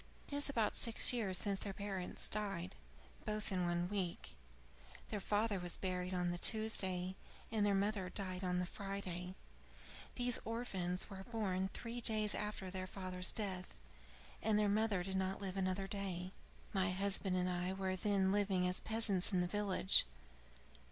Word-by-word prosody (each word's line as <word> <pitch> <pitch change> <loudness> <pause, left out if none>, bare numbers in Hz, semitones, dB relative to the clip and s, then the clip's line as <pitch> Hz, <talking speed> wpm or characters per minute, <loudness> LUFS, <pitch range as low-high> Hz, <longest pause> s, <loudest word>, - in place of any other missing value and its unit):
"It - - -9
is 285 0 +2
about 230 -6 +1
six 230 +1 +4
years 200 -6 0
since 200 +1 +1
their 200 - -4
parents 195 -2 -4
died, 195 -4 -1 0.5
both 215 -1 -2
in 180 -2 +1
one 175 0 0
week: 185 -3 -3 0.8
their 210 - -2
father 205 +1 +1
was 175 -1 -3
buried 180 -1 -2
on 180 -1 0
the 175 - -4
Tuesday, 190 -5 +2 0.4
and 220 -2 +1
their 205 -1 +3
mother 195 -1 0
died 185 -1 -3
on 180 -1 0
the 180 - 0
Friday. 185 -2 -5 0.8
These 245 -1 +3
orphans 190 -6 -2
were 195 -2 -8
born 190 -5 0
three 235 +1 -5
days 215 -2 +3
after 210 -3 -3
their 185 0 -3
father's 185 -1 +3
death, 190 -4 -3 0.6
and 215 -1 +3
their 210 0 +3
mother 205 -2 +2
did 190 +1 -1
not 190 0 -1
live 195 -2 -4
another 190 0 0
day. 190 -2 -3 0.4
My 190 -1 +2
husband 190 0 +2
and 180 0 +1
I 180 +1 -1
were 190 0 -1
then 190 0 +2
living 195 -3 +2
as 180 - +1
peasants 220 -5 +2
in 185 - +2
the 180 - +2
village. 195 0 +3
195 Hz, 165 wpm, -38 LUFS, 185-210 Hz, 0.8 s, six